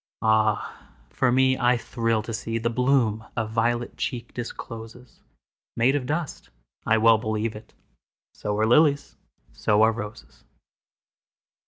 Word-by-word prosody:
Ah, 110 -1 +1 0.2
for 130 -2 +1
me, 130 +1 +3
I 120 0 +3
thrill 115 -2 -1
to 115 - -6
seeThe 115 +1 -2
bloom 125 -4 +1
a 115 - 0
velvet 120 +2 -1
cheek 120 -2 -4
discloses, 115 0 -8 0.6
Made 125 +4 +3
of 130 -3 -2
dust—I 110 - -3
well 110 0 +5
believe 110 0 -2
it! 110 +1 -13 0.6
So 105 0 -3
are 110 - +2
lilies, 145 +4 +3 0.4
so 105 - +2
are 110 - +5
roses! 110 -1 -9
115 Hz, 125 wpm, -25 LUFS, 110-125 Hz, 0.6 s, well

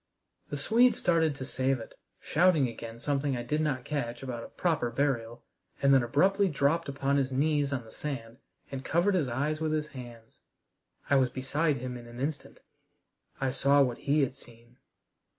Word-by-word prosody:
The 145 - -3
Swede 235 - +4
started 165 -4 +2
to 130 - -6
save 130 0 0
it, 115 - -10 0.3
shouting 165 -4 +3
again 115 -1 -8
something 140 +1 -1
I 120 - -4
did 150 +5 -1
not 140 -5 -1
catch 120 -5 -3
about 120 -3 -5
a - - -8
"proper 160 -9 0
burial" 120 -4 -1 0.4
and 140 0 +4
then 135 - +6
abruptly 190 +12 +3
dropped 150 0 +1
upon 140 0 0
his 135 -1 0
knees 145 +1 +1
on 125 -4 -3
the 110 - -14
sand 120 -6 -6 0.3
and 135 -1 -5
covered 175 +8 +2
his 170 -7 +1
eyes 145 +6 -1
with 155 -1 0
his 150 -1 -1
hands. 120 -5 -11 0.7
I 140 - +4
was 130 -1 +3
beside 140 +4 0
him 125 0 -5
in 120 -1 -11
an 120 +1 -10
instant. 140 +1 -4 0.8
I 135 -1 0
saw 140 +2 +4
what 125 -3 -2
he 145 +2 +2
had 135 -1 0
seen. 120 -2 -17
140 Hz, 185 wpm, -29 LUFS, 125-150 Hz, 0.8 s, then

